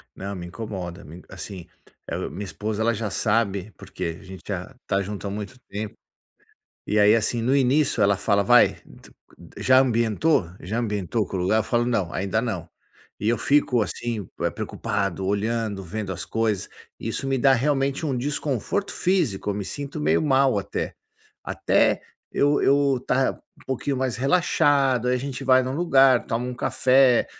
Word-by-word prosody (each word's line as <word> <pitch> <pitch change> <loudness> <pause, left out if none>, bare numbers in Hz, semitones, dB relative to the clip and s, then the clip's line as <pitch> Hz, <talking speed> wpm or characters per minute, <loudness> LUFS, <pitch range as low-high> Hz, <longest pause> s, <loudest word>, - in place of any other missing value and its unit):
Não 100 +1 -5
me 90 -2 -6
incomoda 95 -1 -6
me 85 +4 -12
assim, 95 -4 -8 0.6
minha 105 - -5
esposa 105 +2 -4
ela 115 +1 +2
já 110 -1 -3
sabe 105 -2 0
porque 85 0 -5
a - - -15
gente 95 -1 -11
já 100 +5 -5
está 95 -1 0
junto 100 +1 -6
há - - -2
muito 105 +5 -6
tempo. 105 0 -5 0.9
E 105 - +1
aí 105 +1 +6
assim 115 +1 0
no 130 +4 +2
início 140 +2 +2
ela 100 0 +4
fala 100 +1 +2
vai, - - +5 0.8
já 130 0 +4
ambientou? 115 - +2
Já 105 +6 -3
ambientou 105 -2 -1
com 95 - -5
o - - -1
lugar? 95 +5 +2
Eu - - +2
falo 120 +2 0
não, 100 -8 0
ainda 100 +3 -1
não. 95 -9 -3 0.5
E 105 - -1
eu 120 - +1
fico 140 -3 +2
assim 110 -2 -4 0.3
preocupado, 95 -2 -2
olhando, 105 0 -1
vendo 100 +2 -4
as 95 +1 -5
coisas, 110 -1 -1 0.3
isso - - -3
me 135 -1 0
dá 135 +2 +5
realmente 135 +3 0
um 135 - -1
desconforto 145 - -2
físico, 165 - 0
eu 100 - -2
me 100 - -3
sinto 140 +6 -6
meio - - +2
mal 135 -5 +3
até. 100 - -4 0.5
Até - - +1 0.3
eu 145 +1 +2
eu 140 -1 +3
estar 130 +1 +1
um - - -23
pouquinho 135 +1 -2
mais 130 -2 -1
relaxado, 140 -3 +2
aí 125 - +3
a 125 - 0
gente 135 0 -5
vai 130 0 +5
em - - -4
um 130 - -2
lugar, 135 -7 +4
toma 115 +2 -2
um 125 - -4
café, 130 0 +3
115 Hz, 175 wpm, -24 LUFS, 100-135 Hz, 0.9 s, aí